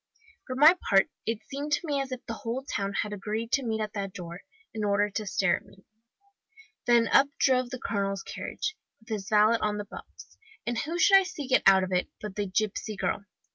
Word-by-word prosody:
For 255 - -4
my 305 +6 +8
part, 195 -1 +4 0.2
it 225 0 -2
seemed 285 +2 -3
to 320 - 0
me 285 -3 0
as 270 -1 -5
if 255 -1 -6
the 230 - -4
whole 235 +4 -4
town 200 -7 -2
had 210 - -6
agreed 215 +3 -4
to 275 - +2
meet 220 -2 -1
at 215 -1 -3
that 195 -3 -4
door, 175 0 -7 0.3
in 220 -1 -3
order 205 0 +2
to 210 +1 -4
stare 195 -1 +2
at - - -14
me. 195 - -20 1.0
Then 235 -1 +5
up 275 - +6
drove 255 -2 +2
the 255 - -5
colonel's 195 -4 -2
carriage, 430 - -4 0.2
with 220 - -21
his 210 -2 -4
valet 215 +2 +4
on 210 -1 0
the 205 - -4
box. - - -12 0.3
And 235 -1 -1
who 330 +4 -3
should 390 +2 +7
I - - 0
see 365 -6 -6
get 255 0 +3
out 190 -1 +7
of 185 - -4
it, 180 - +1
but 210 -3 -7
the 205 -1 -2
gipsy 215 +2 -1
girl! 200 +1 -2
220 Hz, 220 wpm, -28 LUFS, 200-255 Hz, 1.0 s, my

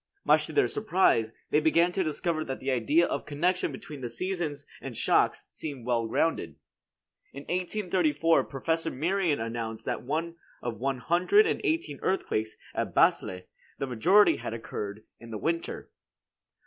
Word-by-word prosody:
Much - - +4
to - - -7
their 420 - +3
surprise, 185 - +2 0.2
they 150 - +5
began 170 +3 +3
to 190 +1 0
discover 155 0 -1
that 135 -3 -5
the 135 - -1
idea 130 +8 +3
of - - -3
connection 170 +4 0
between 140 +1 -9
the 120 - -3
seasons 155 +1 -3 0.2
and 125 -5 -7
shocks - - +2
seemed 140 -6 -6
well 120 -2 +1
grounded. 110 - 0 0.8
In 140 - -8
1834 175 -4 +1
Professor 160 +4 -1
Merian 170 +2 0
announced 115 -1 -4
that - - -1 0.6
of 120 -2 -4
one 135 0 0
hundred 180 - +4
and - - 0
eighteen 340 -2 -1
earthquakes 110 - -1 0.2
at - - -3
Basle, 90 0 +3 0.4
the - - -2
majority 170 - +4
had 115 - -5
occurred 105 -2 -6 0.2
in 115 - -12
the 110 - -4
winter. 165 +7 -3
150 Hz, 150 wpm, -28 LUFS, 120-175 Hz, 0.8 s, they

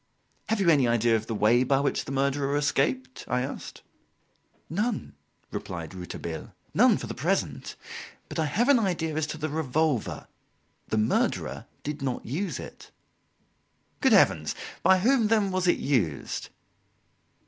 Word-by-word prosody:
"Have 225 -1 +1
you 195 - +1
any 140 -6 +5
idea 115 0 +3
of 110 0 -2
the 115 - -2
way 115 +4 +4
by 135 +1 +2
which 140 - 0
the - - -6
murderer 140 +1 +1
escaped?" 130 -3 0
I 125 - 0
asked. 135 - -7 0.8
"None," 210 +6 -2 0.4
replied 85 -1 -5
Rouletabille 90 -2 -7 0.2
"none, - - +5
for - - -6
the - - -5
present. - - -1 0.5
But - - -5
I 160 - +2
have 220 - +1
an 280 -4 +6
idea 175 -7 -1
as 155 -1 0
to 155 - -5
the 155 0 -2
revolver; 150 -3 0 0.6
the 110 - -1
murderer 110 0 0 0.2
did 150 0 -4
not 130 -3 -2
use 160 - -3
it." - - -10 1.1
"Good - - +4
Heavens! - - +4 0.3
By 190 +2 +5
whom, 240 0 +4
then, 210 -3 +2
was 185 -1 0
it 175 - +4
used?" 100 - -1
145 Hz, 150 wpm, -27 LUFS, 125-175 Hz, 1.1 s, an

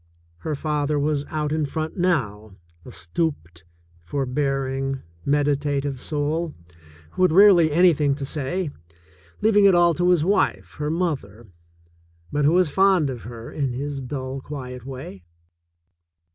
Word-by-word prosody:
Her 150 - -3
father 150 0 -1
was 145 0 0
out 150 -1 -3
in 155 -1 0
front 155 +2 -4
now, 110 - -1 0.3
a - - -11
stooped, 85 - -4 0.4
forbearing, 135 - -2 0.2
medita 145 0 +1
tive 140 -2 -4
soul, 155 +2 -2 0.6
who - - -5
had 185 - +5
rarely 180 -3 +6
anything 150 -4 +4
to 140 -1 -5
say 150 +4 -3 0.3
— 80 +2 -29
leaving 205 -2 +5
it 195 -2 +6
all 175 -1 +5
to 175 +2 +1
his 175 -4 +4
wife, 100 - 0
her 150 0 -1
mother, 140 - -3 0.9
but 145 0 +1
who 155 - +4
was 180 -4 +3
fond 190 -6 +3
of 120 -3 -7
her 115 -1 -8
in 135 -4 -2
his 140 +2 -4
dull, 130 +1 -5
quiet 125 -3 -8
way. 130 -8 -8
145 Hz, 145 wpm, -23 LUFS, 130-160 Hz, 0.9 s, rarely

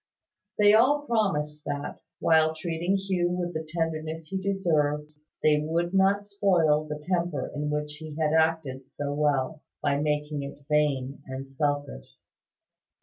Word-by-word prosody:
They 205 0 +6
all 285 +7 +4
promised 150 - 0
that, 145 0 -4 0.2
while 160 -1 +4
treating 170 +3 -1
Hugh 190 -3 0
with 175 0 -2
the 160 - -3
tenderness 160 0 -3
he 190 - -2
deserved, 155 -6 0 0.3
they 150 -1 +4
would 170 +3 -1
not 195 +1 +3
spoil 175 -7 +2
the 150 0 -6
temper 170 -6 -1
in 150 0 -2
which 150 0 -3
he 155 -1 -8
had 155 -1 +2
acted 160 -5 +1
so 145 +1 -4
well, 145 0 0 0.2
by 140 -1 +1
making 150 0 -1
it 140 0 -8
vain 140 -3 +1
and 130 +1 -6
selfish. 145 - -3
155 Hz, 145 wpm, -27 LUFS, 150-175 Hz, 0.3 s, They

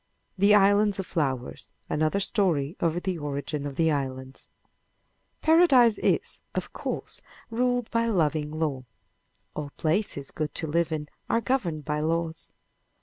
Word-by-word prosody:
THE 200 +2 +5
ISLANDS 205 0 +4
OF 195 - -3
FLOWERS 135 -8 -2
Another 155 +5 +1
Story 180 -8 +1
of 170 +1 0
the 185 -3 -2
Origin 145 0 -3
of 140 - -7
the 160 +1 +3
Islands 130 -2 -4 0.9
Paradise 285 -9 +5
is, - - 0
of - - -3
course, - - -3 0.3
ruled 245 0 +1
by 230 0 +1
loving 155 -7 +1
law. 150 -4 -2 0.7
All 150 -1 -4
places 155 -4 -1
good 155 -1 -4
to - - 0
live 165 +1 0
in 150 -1 -3 0.2
are 230 - +3
governed 200 - -1
by 150 -1 -1
laws. 165 +1 -2
160 Hz, 140 wpm, -27 LUFS, 150-205 Hz, 0.9 s, THE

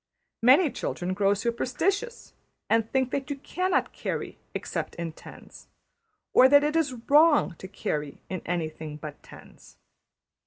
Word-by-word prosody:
Many 270 +6 +6
children 180 +1 -3
grow 200 +1 +2
superstitious, 325 - -2 0.4
and 225 -1 +2
think 260 -1 +1
that 280 +1 -3
you 285 - -2
cannot 365 +7 -1
carry - - -4 0.2
except - - -4
in 170 -1 -4
tens; - - -14 0.7
or 260 - +7
that 285 +1 +6
it 300 +1 0
is 300 -6 +1
wrong 295 - +5
to 190 - -8
carry 150 -6 -4
in 185 -2 -4
anything 160 -3 -4
but 150 -1 -9
tens. - - -16
245 Hz, 140 wpm, -27 LUFS, 180-295 Hz, 0.7 s, or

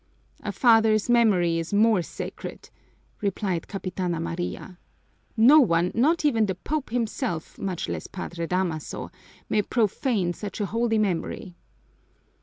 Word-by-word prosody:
"A - - -3
father's 225 -2 +4
memory 185 -8 +3
is 165 +4 -3
more 215 -2 +4
sacred!" - - -8 0.5
replied 195 -4 -2
Capitana 185 -3 -3
Maria. 175 +2 -5 0.6
"No 260 +8 +8
one, 175 - +3
not 305 +7 +2
even 225 -7 +3
the 190 - -2
Pope 290 - -3
himself, 230 - -3
much 185 -3 -3
less - - -4
Padre 175 -2 -5
Damaso, 180 -4 -2 0.4
may 210 - +2
profane 210 -4 0
such 205 +4 -7
a 205 - 0
holy 230 +2 0
memory." 185 -3 -2
205 Hz, 125 wpm, -25 LUFS, 175-230 Hz, 0.6 s, No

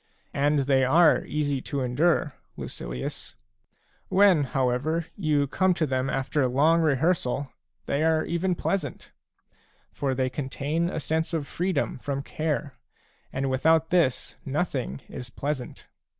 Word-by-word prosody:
And 145 +1 +2
they 135 -1 +3
are 160 +6 +5
easy 145 -3 -1
to 140 +1 -3
endure, 145 +4 +1 0.2
Lucilius; - - -6 0.7
when, 190 -6 +5
however, 135 +6 0
you 150 -6 +1
come 185 +6 +2
to 160 - +1
them 130 -1 -1
after 135 +1 0
long 155 +7 +3
rehearsal, 145 -3 +1 0.3
they 145 +2 0
are 160 -1 +2
even 175 +2 0
pleasant; 165 -7 -3 0.8
for 135 -2 -1
they 130 0 +1
contain 145 +5 -2
a 170 - -3
sense 160 +2 -1
of 155 -3 -2
freedom 175 -4 -1
from 140 +1 -3
care, 150 -2 -2 0.3
— - - -37
and 135 +1 -1
without 160 +4 +3
this 165 -8 +1
nothing 140 -2 -2
is 125 -2 -8
pleasant. 135 0 -4
145 Hz, 135 wpm, -26 LUFS, 130-160 Hz, 0.8 s, are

